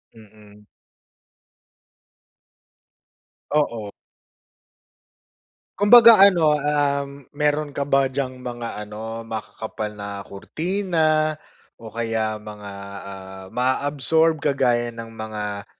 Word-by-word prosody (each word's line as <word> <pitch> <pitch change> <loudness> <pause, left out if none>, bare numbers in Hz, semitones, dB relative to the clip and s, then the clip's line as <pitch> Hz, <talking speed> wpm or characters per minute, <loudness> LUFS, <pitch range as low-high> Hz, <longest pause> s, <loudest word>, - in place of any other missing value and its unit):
Mm. 105 -1 -18 2.9
Oo. 115 -9 0 1.9
Kumbaga 230 +1 +8
ano, 175 -6 +6
um, 140 -2 -1
mayro'n 150 0 0
ka - - -3
ba 140 -1 +3
diyang 130 -1 -3
mga 120 -1 -5
ano, 110 +2 -7
makakapal 110 -1 -5
na 100 -1 -6
kurtina 155 - 0 0.5
o 115 - -8
kaya 110 -1 -2
mga, 105 -1 -9 0.3
ah, 95 -1 -10
maa-absorb 145 +6 +1
kagaya 125 -5 +1
ng 115 0 -8
mga, 105 -2 -5
125 Hz, 85 wpm, -22 LUFS, 110-150 Hz, 2.9 s, Kumbaga